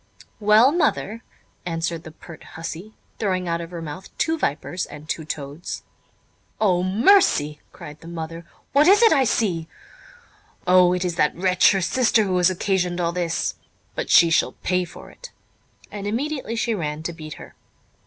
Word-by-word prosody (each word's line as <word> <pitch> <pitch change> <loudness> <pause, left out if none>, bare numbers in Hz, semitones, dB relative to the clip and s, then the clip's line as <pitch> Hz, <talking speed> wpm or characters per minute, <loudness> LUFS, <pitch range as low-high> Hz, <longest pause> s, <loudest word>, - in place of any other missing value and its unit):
"Well, 215 +5 +5
mother?" 230 - 0 0.4
answered 165 -1 -3
the 160 - -9
pert 160 0 -13
hussey, 170 +6 -7 0.2
throwing 185 -4 -1
out 170 0 -1
of 165 - -7
her 170 -2 -7
mouth 165 +5 -8
two 325 - +1
vipers 175 - -2
and 150 +1 -11
two 160 -1 -3
toads. 145 +2 -6 0.8
"O 185 -5 +2
mercy!" 185 - +3
cried 150 0 -11
the 165 - -12
mother, 165 0 -6 0.3
"what 290 +3 +5
is 410 +5 +6
it 455 - +7
I 270 -4 +3
see! 180 -9 0 1.0
O, 180 0 +5
it 180 0 -1
is 175 -1 -3
that 150 - +2
wretch 180 0 +4
her 195 - 0
sister 230 +2 +2
who 185 -2 0
has 180 0 +4
occasioned 180 -1 -1
all 170 -1 0
this; 170 -1 -2 0.4
but - - -4
she 170 -1 +6
shall - - +2
pay 180 0 +1
for 170 - -13
it"; - - -12 0.6
and 205 -1 -5
immediately 260 +2 -3
she 230 0 0
ran 155 -5 -4
to 170 - -4
beat 155 -2 -8
her. - - -12
180 Hz, 170 wpm, -23 LUFS, 165-215 Hz, 1.0 s, it